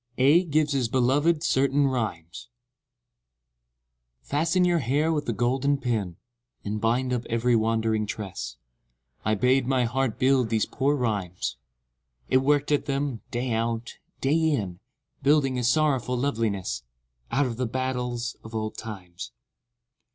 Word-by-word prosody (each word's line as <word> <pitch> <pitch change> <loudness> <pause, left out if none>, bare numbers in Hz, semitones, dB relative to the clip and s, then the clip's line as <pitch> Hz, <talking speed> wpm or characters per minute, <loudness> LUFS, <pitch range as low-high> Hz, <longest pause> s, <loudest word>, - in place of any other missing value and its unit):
29 135 +3 +5
AEDH 175 -4 -5
GIVES 150 0 +2
HIS 130 -4 +1
BELOVED 145 +6 +2
CERTAIN 140 +2 +2
RHYMES 110 -9 -3 1.8
Fasten 165 +5 +1
your 175 -1 +3
hair 145 +5 +1
with 150 -4 -2
a - - +3
golden 130 +5 +1
pin, 110 -10 -2 0.5
And 105 +1 -3
bind 125 +3 +1
up 125 -1 -1
every 120 +1 +2
wandering 110 -1 +1
tress; 100 -3 -5 0.7
I 110 +1 +1
bade 125 +4 +2
my 130 -2 +2
heart 125 0 -1
build 130 -3 +3
these 110 -1 +1
poor 140 +3 0
rhymes: 105 -9 -2 0.7
It 130 - +5
worked 145 +2 +2
at 145 - +2
them, 140 -4 -2
day 120 +1 -2
out, 115 +1 -2 0.2
day 140 +3 +2
in, 100 - -2 0.4
Building 140 -2 +3
a - - -2
sorrowful 125 -1 +2
loveliness 110 - -1 0.5
Out 145 +1 +2
of 120 -3 -4
the 125 -1 -1
battles 125 -1 -2
of 110 0 -9
old 110 -1 -3
times. 90 - -8
125 Hz, 140 wpm, -26 LUFS, 110-140 Hz, 1.8 s, 29